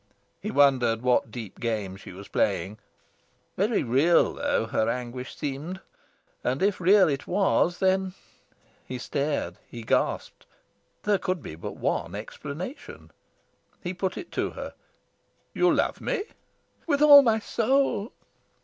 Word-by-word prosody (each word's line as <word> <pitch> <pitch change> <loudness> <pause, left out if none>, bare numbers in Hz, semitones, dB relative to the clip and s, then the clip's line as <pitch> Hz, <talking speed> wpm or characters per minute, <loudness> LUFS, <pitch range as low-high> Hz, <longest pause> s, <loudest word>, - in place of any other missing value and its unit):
He 215 - -4
wondered 130 - +3
what 125 -2 +2
deep 110 -3 -8
game 105 -5 -2
she 95 - -11
was 100 +2 -10
playing. 95 +6 -1 0.8
Very 210 +4 +1
real, 140 +8 +3
though, - - 0
her 110 0 0
anguish 125 +1 -5
seemed; 150 +6 -4 0.6
and, 130 +7 0
if 200 -2 +1
real 195 +2 +6
it 140 -3 -2
was, 180 -2 +2
then 190 0 +1 0.7
he 130 - -6
stared, 140 - -2
he 120 -1 -8
gasped - - -1 0.6
there 205 -2 +2
could 185 -3 -2
be - - -7
but 80 - -7
one - - -2
explanation. 165 - -8 0.7
He 180 0 -3
put 185 +1 -3
it 355 - -8
to - - -1
her. - - -7 0.8
"You - - +3
love - - 0
me?" 400 - -1 0.6
"With 290 -2 +2
all 290 -1 +11
my 225 -5 +3
soul." 235 0 0
150 Hz, 135 wpm, -26 LUFS, 120-200 Hz, 0.8 s, all